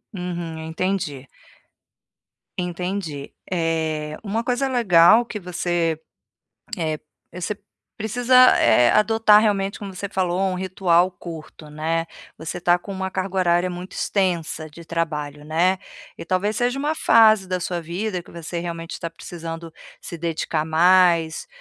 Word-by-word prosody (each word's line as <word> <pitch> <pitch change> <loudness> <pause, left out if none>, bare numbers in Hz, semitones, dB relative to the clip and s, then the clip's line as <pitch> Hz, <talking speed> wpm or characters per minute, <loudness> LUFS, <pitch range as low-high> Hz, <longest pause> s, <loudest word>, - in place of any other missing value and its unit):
Uhum, 175 -3 -5
eu 160 - -6
entendi. 160 -5 -2 1.3
Entendi, 180 -4 -4 0.2
eh, 160 -3 -1
uma 220 +2 -2
coisa 250 +2 0
legal 220 -3 +5
que 220 -2 -6
você, 175 -3 -1 0.8
eh, 155 -2 -2 0.3
você 180 +3 -4 0.4
precisa, 245 +4 +5
eh, 120 +2 +5
adotar, 215 0 +5
realmente, 200 -2 0
como 200 -2 -7
você 200 +3 -4
falou, 185 -2 -1
um 190 -1 +1
ritual 185 -1 +2
curto, 160 -3 -10
né, 165 +2 -1 0.3
você 160 +2 -5
está 175 +1 +3
com 200 - -9
uma 190 0 -3
carga 190 0 -4
horária 175 0 +2
muito 180 +1 -7
extensa 170 -5 -1
de 165 +2 -13
trabalho, 150 -3 -3
né, 175 +5 +1 0.4
e - - -8
talvez 190 +5 0
seja 245 +3 0
uma 295 +3 0
fase 220 -8 +5
da 185 0 -1
sua 175 0 -3
vida 180 +3 -3
que - - -18
você, 170 0 -5
realmente, 170 -1 -6
está 170 - -5
precisando 165 -1 -8 0.3
se 170 - -8
dedicar 160 -1 -2
mais, 170 0 +3
175 Hz, 140 wpm, -22 LUFS, 165-195 Hz, 1.3 s, legal